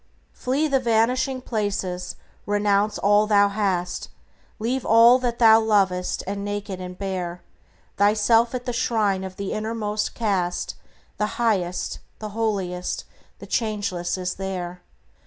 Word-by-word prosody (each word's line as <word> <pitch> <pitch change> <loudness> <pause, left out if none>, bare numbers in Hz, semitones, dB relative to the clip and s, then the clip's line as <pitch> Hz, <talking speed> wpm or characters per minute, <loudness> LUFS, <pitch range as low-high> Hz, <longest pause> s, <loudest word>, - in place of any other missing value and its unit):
Flee 275 +5 0
the 275 -2 +2
vanishing 250 +3 +1
places; 200 -6 -3 0.3
renounce 205 0 +2
all 205 +1 +3
thou 205 -1 +5
hast; 195 -4 -1 0.5
Leave 245 +4 -1
all 230 +3 +7
that 240 -2 -2
thou 225 -1 +7
lovest, 195 -5 +1
and, 200 +1 -4
naked 205 -2 -4
and 180 0 -7
bare, 180 -3 -4 0.5
Thyself 220 +4 +3
at 245 - -4
the 245 - -2
shrine 215 -5 +1
of 190 -1 -7
the 200 0 -4
Innermost 215 -1 -2
cast; 190 -6 -1 0.4
The 210 0 -2
Highest, 195 -7 0 0.2
the 215 - -6
Holiest, 200 -5 -2 0.3
the - - -10
Changeless 200 -6 -1
is 180 0 -2
there. 180 -2 -5
205 Hz, 130 wpm, -24 LUFS, 190-225 Hz, 0.5 s, all